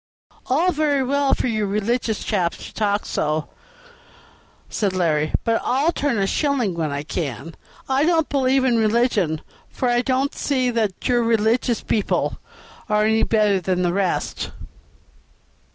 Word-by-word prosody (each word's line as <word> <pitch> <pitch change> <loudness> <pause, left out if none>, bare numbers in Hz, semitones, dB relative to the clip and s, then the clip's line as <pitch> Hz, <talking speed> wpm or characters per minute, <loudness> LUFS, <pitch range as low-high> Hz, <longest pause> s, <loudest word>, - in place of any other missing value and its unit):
"All 325 +8 +2
very 295 -4 +1
well 280 +1 +2
for - - -2
you 215 -4 0
religious 215 +2 -1
chaps 180 -6 -1
to - - -11
talk 205 -1 0
so," 155 +1 -1 1.2
said 200 -3 -1
Larry; 155 -4 +1
"but 230 -1 +1
I'll 275 +6 +2
turn 285 -7 -1
a 195 - +1
shilling 255 - 0
when 165 -2 -2
I 140 0 -3
can. 155 - -4 0.3
I 270 +1 +2
don't 325 -1 +2
believe 265 -1 +2
in 240 -3 +3
religion, 215 -8 +1 0.3
for 250 - -1
I 240 0 +3
don't 265 +2 0
see 255 -3 0
that 220 -5 -1
your 245 -1 +3
religious 230 +1 +1
people 210 - -1 0.5
are 210 0 +3
any 220 +1 +2
better 210 -3 +2
than 180 0 0
the 175 -1 +1
rest." 190 -2 -1
225 Hz, 150 wpm, -22 LUFS, 190-260 Hz, 1.2 s, in